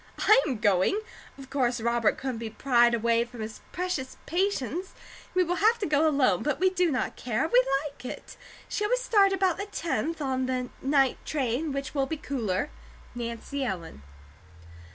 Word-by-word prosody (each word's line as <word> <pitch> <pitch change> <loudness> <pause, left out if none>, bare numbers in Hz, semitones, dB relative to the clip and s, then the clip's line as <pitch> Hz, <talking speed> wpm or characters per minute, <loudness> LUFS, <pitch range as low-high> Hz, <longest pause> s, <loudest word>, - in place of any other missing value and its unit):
I 435 +3 +6
am 260 -5 -1
going. 205 - +2 0.4
Of 270 -1 -12
course 250 -3 +1
Robert 235 0 +1
couldn't 260 -4 -4
be 230 -1 -4
pried 240 0 +3
away 230 0 +2
from 240 -1 -10
his 215 0 -7
precious 355 -7 -3
patients; 360 - -1 0.4
we 365 - +5
will 355 +1 -1
have 445 +4 +4
to 415 - -2
go 305 0 +3
alone; 260 - +3
but 295 -2 -1
we 375 +1 +3
do 365 -2 +2
not 260 -4 -1
care. 245 +5 -1
We 255 -5 +5 0.2
like 285 -4 -8
it. 255 - -8 0.3
Shall 420 0 -1
we - - +4
start 415 -5 +3
about 380 -3 +1
the 400 - -4
tenth, 330 -3 -2
on 260 -3 -1
the 255 -1 -2
night 270 -1 +2
train, 280 +1 -1
which 275 0 -4
will 275 -2 0
be 320 - -3
cooler? 245 -5 -2 0.4
NANCY 240 +4 -4
ELLEN. 170 - -5
270 Hz, 175 wpm, -27 LUFS, 240-340 Hz, 0.4 s, I